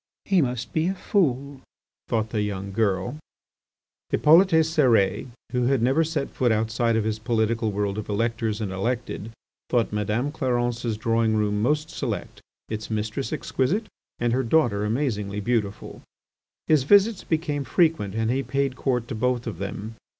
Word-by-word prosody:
"He 190 -3 +3
must 125 -3 -3
be 160 +1 +1
a 190 - -1
fool," 140 - 0 0.5
thought 110 -1 -1
the 105 -1 0 0.2
girl. 105 +5 0 0.9
Hippolyte 165 +6 +6 0.2
Cérès, 130 - +2 0.2
who 125 -1 +1
had 135 -3 +2
never 135 +6 +3
set 155 -3 -2
foot 125 -2 +1
outside 110 +1 +1
of 110 - +1
his 110 0 -2
political 110 -1 0
world 100 0 -1
of 110 - -7
electors 110 0 -1
and 100 -3 -2
elected, 115 +2 -3 0.4
thought 120 -4 +1
Madame 105 +6 -1
Clarence's 120 -5 -1
drawing 115 0 +1
room 105 -1 +1
most 150 +6 0
select, - - -4 0.3
its 110 0 -5
mistress 110 +4 -2
exquisite, 155 - -1 0.3
and 120 0 0
her 130 - +2
daughter 115 -6 +2
amazingly 105 -4 -1
beautiful. 105 -2 -2 0.6
His 155 -3 +4
visits 200 - +4
became 155 -3 -1
frequent 155 - +1
and 115 +1 0
he 135 +2 +1
paid 135 +1 -1
court 125 -3 -1
to - - -3
both 120 +1 0
of 105 -8 -5
them. 100 +2 -5
120 Hz, 150 wpm, -25 LUFS, 110-140 Hz, 0.9 s, Hippolyte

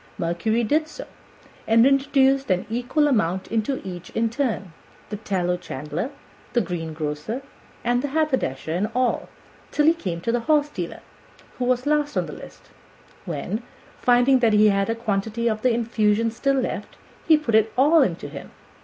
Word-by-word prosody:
Mercury 175 +8 0
did 305 +8 +1
so, - - -9 0.6
and 230 +1 +5
introduced 275 -1 +3
an 185 -1 +1
equal 250 +6 +1
amount 190 - +1
into 230 +4 0
each 180 -1 -7
in 225 0 +1
turn 225 - -2 0.4
the 210 - -3
tallow 180 -4 -1
chandler, 150 +1 -4
and 270 - -7 0.4
the 240 - +3
greengrocer, 165 - -4 0.4
and 245 +1 +1
the 285 - -2
haberdasher, 270 - -1
and 195 +5 0
all, 255 0 0 0.4
till 295 - +1
he 320 - +6
came 185 - -4
to 230 - -1
the 240 - +1
horse 295 +4 +2
dealer, 180 -11 -6 0.6
who 250 - 0
was 250 0 +1
last 295 0 +1
on - - +1
the - - -8
list, - - -12 0.6
when, 175 - -3 0.4
finding 245 +2 +4
that 230 -3 +3
he 210 0 +6
had 195 +1 +1
a 225 - +1
quantity 220 +1 -1
of 215 -1 0
the 255 - +3
infusion 230 -1 +1
still 275 +4 0
left, 250 - -4 0.3
he 315 -1 +7
put 300 -7 -3
it 220 0 +4
all 300 +5 +6
into 180 -10 0
him. - - -9
230 Hz, 170 wpm, -23 LUFS, 195-270 Hz, 0.6 s, he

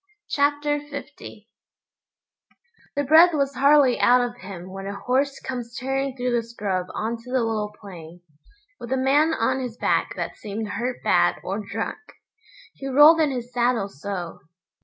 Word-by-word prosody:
Chapter 290 +1 +1
50 285 -6 -10 1.5
The 285 - 0
breath 320 +4 +6
was 280 -1 0
hardly 275 -1 +4
out 250 +1 +5
of 245 0 -3
him 185 -1 -9
when 195 +1 -7
a 200 - -5
horse 270 +2 0
comes 240 -3 -6
tearing 270 +1 -2
through 250 0 -1
the 240 -1 +1
scrub 200 -6 -3
on 225 +2 -2
to 240 +2 -12
the 255 -2 +1
little 215 -2 -2
plain, 175 -4 -11 0.6
with 240 - -8
a 265 - +1
man 285 +5 +3
on 260 +4 0
his 245 -3 -6
back - - 0
that - - -5
seemed 210 +1 -5
hurt 245 +3 -4
bad - - +3
or - - -3
drunk, - - -4 0.7
he 275 - -8
rolled 295 +5 +7
in 305 - +3
his 245 -2 -5
saddle 240 -4 +1
so. 180 +1 -6
250 Hz, 160 wpm, -24 LUFS, 215-275 Hz, 1.5 s, rolled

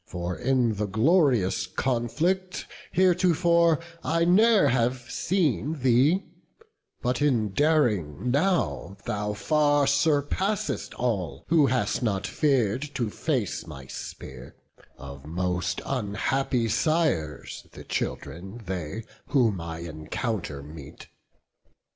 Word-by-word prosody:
For 90 0 -4
in 125 -3 +1
the 105 0 -1
glorious 115 - +2
conflict 150 - -1 0.3
heretofore 170 -2 +3 0.2
I 165 +2 +1
ne'er 205 -2 +5
have 125 0 0
seen 155 - 0
thee; 135 +9 +3 0.8
but 125 +2 0
in 120 -8 +2
daring 120 - +1
now 145 - 0
Thou 105 0 -2
far 145 +5 +2
surpassest 145 +8 0
all, 110 -8 -2
who 155 -4 +5
hast 130 0 0
not 100 -5 -1
fear'd 130 -3 +1
To 120 -6 -1
face 120 - -2
my 70 -4 -9
spear; 65 -1 -9 0.4
of 70 +1 -10
most 90 +1 -2
unhappy 125 +1 -1
sires 110 - -1
The - - -11
children 95 +7 -5
they, 90 +3 -4 0.2
who 125 -6 +3
my 85 -3 -6
encounter 80 - -4
meet. 75 -1 -11
120 Hz, 105 wpm, -26 LUFS, 95-150 Hz, 0.8 s, ne'er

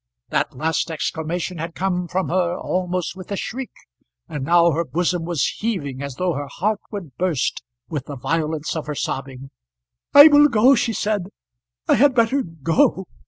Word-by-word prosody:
That - - -1
last 160 +3 -1
exclamation 165 +2 -3
had 165 +1 -5
come 180 -1 -1
from 185 +2 -2
her 175 0 0
almost 180 -1 -2
with 185 +1 -11
a - - 0
shriek, 250 +6 -5 0.6
and 145 - -5
now 170 +3 +4
her 165 +2 0
bosom 175 0 -1
was 170 -5 0
heaving 150 - -3
as 140 -2 -5
though 180 +2 0
her 145 0 -4
heart 205 +9 -1
would 180 - -8
burst 175 -8 -1 0.3
with 145 -4 -5
the 145 - -6
violence 155 +3 -2
of 155 -2 -4
her 150 - -3
sobbing. 135 -1 -5 0.6
"I 285 +2 +10
will 295 -1 +7
go," 245 +1 +5
she 235 -2 +1
said. 205 -4 -1 0.6
"I - - +4
had 275 +2 +4
better 235 +4 +3
go." 165 - +1
175 Hz, 170 wpm, -21 LUFS, 155-195 Hz, 0.6 s, I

